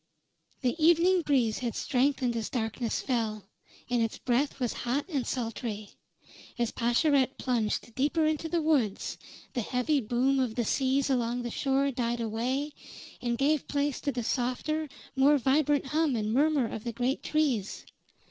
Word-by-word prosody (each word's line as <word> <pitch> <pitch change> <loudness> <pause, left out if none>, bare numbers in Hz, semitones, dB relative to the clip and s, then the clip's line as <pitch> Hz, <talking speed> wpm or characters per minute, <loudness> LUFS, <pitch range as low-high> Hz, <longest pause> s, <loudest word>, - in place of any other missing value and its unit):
The 250 -3 +1
evening 345 +3 +5
breeze 260 -8 +1
had 240 -3 -3
strengthened 255 -2 +1
as 225 -2 -2
darkness 230 -1 -2
fell, 220 -5 -1 0.4
and 245 -1 +1
its 225 -1 -1
breath 265 +3 0
was 245 -3 -1
hot 255 +4 -1
and 280 -9 -2
sultry. 225 -3 -4 0.7
As 235 -2 0
Pascherette 260 +3 +2
plunged 235 -2 -1
deeper 295 +5 +1
into 310 +1 0
the 335 0 0
woods, 270 -11 0 0.3
the 245 - -1
heavy 255 +5 0
boom 255 +4 +1
of 245 -4 0
the 240 - 0
seas 270 +3 +1
along 245 -1 0
shore 275 +2 +1
died 240 -2 -1
away 245 +6 -1 0.5
and 240 -1 -1
gave 290 +2 +1
place 285 -1 -1
to 285 - 0
the 240 -2 -3
softer, 275 +6 -1 0.3
more 280 +2 +5
vibrant 285 +2 +2
hum 300 -1 +1
and 215 -1 -1
murmur 285 -1 +3
of 220 - -6
the 235 - -4
great 250 +3 -1
trees. 270 -10 -1
255 Hz, 155 wpm, -29 LUFS, 235-285 Hz, 0.7 s, evening